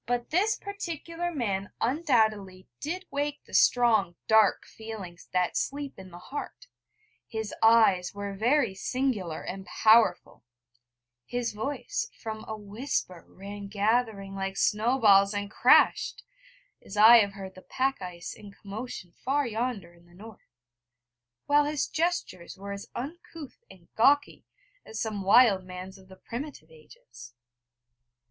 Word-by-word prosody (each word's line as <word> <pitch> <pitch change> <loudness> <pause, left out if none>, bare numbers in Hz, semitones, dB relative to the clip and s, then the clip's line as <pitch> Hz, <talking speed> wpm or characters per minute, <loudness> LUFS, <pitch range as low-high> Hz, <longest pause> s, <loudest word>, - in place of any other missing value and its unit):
But 240 0 -2
this 410 +6 +2
particular 350 -3 -5
man 205 - -3
undoubtedly 220 - 0
did 360 +6 -4
wake 290 +1 -3
the - - -18
strong 220 -8 +3
dark 220 -2 +4
feelings 205 -6 -10
that 180 -1 0
sleep 280 -3 -3
in 190 -1 -11
the 175 - -11
heart; 290 - -8 0.6
his 220 -1 -5
eyes 220 -5 +5
were 200 0 -6
very 235 +2 +2
singular 205 -5 -2
and 190 +1 -6
powerful; 220 -4 +3 0.8
his 245 - -3
voice 285 - -3
from 220 -1 -6
a 220 - -5
whisper 205 -4 -4
ran 200 +1 -9
gathering, 205 -1 0
like 195 0 -4
snow 225 +5 +2
balls, 200 -3 +5
and 205 0 -3
crashed, - - +4 0.6
as 200 - -9
I 225 +3 +9
have 200 -3 +2
heard 190 -1 -8
the 185 - -13
pack 265 +1 -1
ice 180 -1 -7
in 205 -1 -12
commotion 200 -2 -8
far 280 +2 +1
yonder 225 -6 -3
in 170 0 -22
the 175 - -20
North; 215 +2 -14 1.0
while 290 0 +4
his 295 -1 -1
gestures 320 - -2
were 200 +1 -7
as 200 0 -7
uncouth 305 +2 -8
and 175 -3 -17
gawky 285 +6 +2 0.4
as 220 - -8
some 215 -3 -3
wild 200 -1 +5
man's 185 +1 -9
of 190 - -18
the 190 - -14
primitive 235 - -8
ages. 120 -6 -15
215 Hz, 140 wpm, -28 LUFS, 195-260 Hz, 1.0 s, I